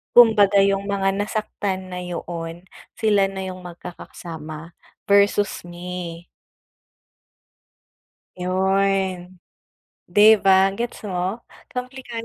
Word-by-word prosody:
Kumbaga 210 -4 +7
yung 195 0 +2
mga 195 -1 +1
nasaktan 200 -2 -3
na 180 0 -6
yoon. 170 0 -6 0.3
Sila 200 -3 +3
na 190 -1 -5
yung 185 -1 -8
magkakasama 170 -2 -9 0.3
versus 200 0 +3
me. 175 -1 -7 2.1
Yun, 190 0 0 0.7
'di 210 +4 +7
ba, 190 0 +6
gets 240 0 -4
mo? 185 +5 -2 0.3
Komplikad 250 -2 -6
190 Hz, 90 wpm, -22 LUFS, 180-200 Hz, 2.1 s, Kumbaga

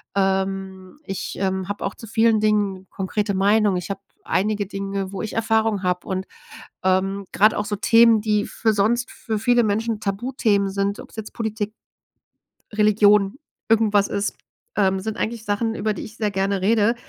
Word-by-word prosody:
ähm, 190 +2 -1
ich, 195 -1 -5
ähm, 190 -1 -1
habe 205 - -3
auch - - -2
zu 225 - -11
vielen 225 0 +3
Dingen 205 -3 +1
konkrete 200 +2 -2
Meinung. 200 0 +3
Ich 180 +1 -5
habe 195 0 -5 0.2
einige 205 +1 0
Dinge, 195 -1 -4
wo 195 - -4
ich 215 - -5
Erfahrung 220 -2 +1
habe. 180 -1 -1
Und, 190 0 -2 0.6
ähm, 195 +1 +1
gerade 215 +2 +4
auch 205 - 0
so 205 - -2
Themen, 230 +2 +5
die 210 -1 +1
für 220 -1 0
sonst 235 +5 +1
für 220 -3 -4
viele 240 +1 +3
Menschen 220 +1 0
Tabuthemen 205 -1 0
sind. 200 +1 -1
Ob's - - -13
jetzt 220 -1 -7
Politik, 220 -1 -3 1.0
Religion 210 +1 +4 0.3
irgendwas 215 -3 +3
ist, 200 +1 -2 0.4
ähm, 190 -2 +2
sind 220 +3 -4
eigentlich 225 0 -3
Sachen, 225 +2 -1
über 215 0 -1
die - - -6
ich 215 - -11
sehr 210 -2 0
gerne 195 0 0
rede. 220 +3 +3
205 Hz, 170 wpm, -22 LUFS, 195-220 Hz, 1.0 s, Themen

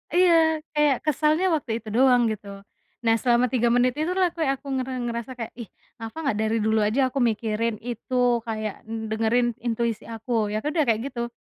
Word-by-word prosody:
Iya 325 -3 +4
kayak 295 -2 +3
kesalnya 305 +4 +2
waktu 265 -7 -4
itu - - -16
doang 250 -1 +5
gitu, 210 -1 -7 0.6
nah 225 -1 +4
selama 245 -1 +3
3 240 -2 +2
menit 245 +1 +3
itulah 360 +2 +1
kayak 315 -5 +1
aku 275 +1 -15
nger 260 0 -2 0.2
ngerasa 235 +1 -4
kayak, 230 -2 -5
"Ih 230 - -6 0.3
kenapa 225 -1 -7 0.2
gak 210 - -4
dari 220 +1 +1
dulu 220 0 +2
aja 230 +6 0
aku 275 - -2
mikirin 220 +1 -1
itu 245 +2 -5 0.3
kayak 215 -2 -3 0.3
dengerin 225 +2 +1 0.2
intuisi 230 -1 -1
aku." 225 +1 -8 0.2
Ya 215 +1 -2
udah 305 +1 +1
kayak 225 -1 +2
gitu, 235 -2 -3
240 Hz, 180 wpm, -24 LUFS, 225-290 Hz, 0.6 s, doang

